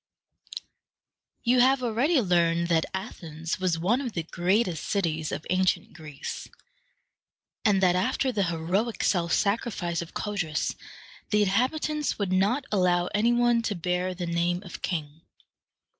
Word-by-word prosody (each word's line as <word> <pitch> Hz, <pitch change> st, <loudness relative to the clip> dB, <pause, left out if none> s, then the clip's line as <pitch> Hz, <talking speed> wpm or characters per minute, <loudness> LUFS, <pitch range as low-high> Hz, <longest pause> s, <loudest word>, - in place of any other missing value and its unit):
You 245 Hz, +1 st, +3 dB
have 260 Hz, +1 st, +4 dB
already 250 Hz, +7 st, +2 dB
learned 170 Hz, -3 st, +2 dB
that 165 Hz, -2 st, +2 dB
Athens 165 Hz, -5 st, -5 dB
was 180 Hz, -3 st, +1 dB
one 210 Hz, +11 st, +1 dB
of 245 Hz, -5 st, -4 dB
the 165 Hz, -, -2 dB
greatest 180 Hz, +1 st, 0 dB
cities 160 Hz, -6 st, -1 dB
of 155 Hz, -, -4 dB
ancient 185 Hz, 0 st, +1 dB
Greece, 150 Hz, -4 st, -7 dB, 1.2 s
and 200 Hz, -4 st, +3 dB
that 180 Hz, -1 st, +4 dB
after 255 Hz, +8 st, +1 dB
the 200 Hz, -5 st, 0 dB
heroic 175 Hz, +7 st, -1 dB
self 170 Hz, -3 st, +1 dB
sacrifice 200 Hz, -5 st, 0 dB
of 170 Hz, -, -9 dB
Codrus 195 Hz, -8 st, -2 dB, 0.6 s
the 210 Hz, 0 st, +3 dB
inhabitants 275 Hz, +9 st, 0 dB
would 200 Hz, -3 st, -2 dB
not 210 Hz, +9 st, +2 dB
allow 180 Hz, -3 st, +2 dB
any 215 Hz, +4 st, +3 dB
one 240 Hz, -1 st, +3 dB
to 220 Hz, -3 st, -2 dB
bear 180 Hz, +1 st, -1 dB
the 180 Hz, -1 st, -4 dB
name 170 Hz, +2 st, 0 dB
of 185 Hz, -, -9 dB
king. 155 Hz, -3 st, -4 dB
185 Hz, 140 wpm, -27 LUFS, 170-225 Hz, 1.2 s, have